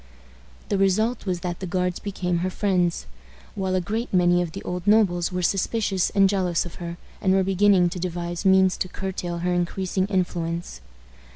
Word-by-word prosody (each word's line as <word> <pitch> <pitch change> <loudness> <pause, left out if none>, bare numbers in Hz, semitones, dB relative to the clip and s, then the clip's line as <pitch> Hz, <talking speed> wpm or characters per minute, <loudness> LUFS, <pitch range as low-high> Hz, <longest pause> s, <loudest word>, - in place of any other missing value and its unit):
The 200 - +1
result 215 +4 +1
was 180 -2 -1
that 175 -1 -4
the 185 - -5
Guards 180 0 -1
became 180 -3 -2
her 185 +2 -1
friends, 180 - 0 0.5
while 190 -2 -1
a - - +3
great 220 +7 -3
many 175 -1 +3
of 170 -2 -4
the - - -7
old 180 +2 -5
nobles 190 -5 +3
were 180 0 -2
suspicious 195 0 +1
and 195 -1 +4
jealous 185 -4 0
of 175 - -10
her, 170 0 -5 0.2
and 190 0 +3
were 190 - +3
beginning 195 -1 +4
to 180 +1 -6
devise 175 -1 -4
means 190 -1 +4
to - - -2
curtail 180 -2 -4
her 180 - +1
increasing 185 +2 -1
influence. 175 - -2
185 Hz, 180 wpm, -24 LUFS, 175-195 Hz, 0.5 s, and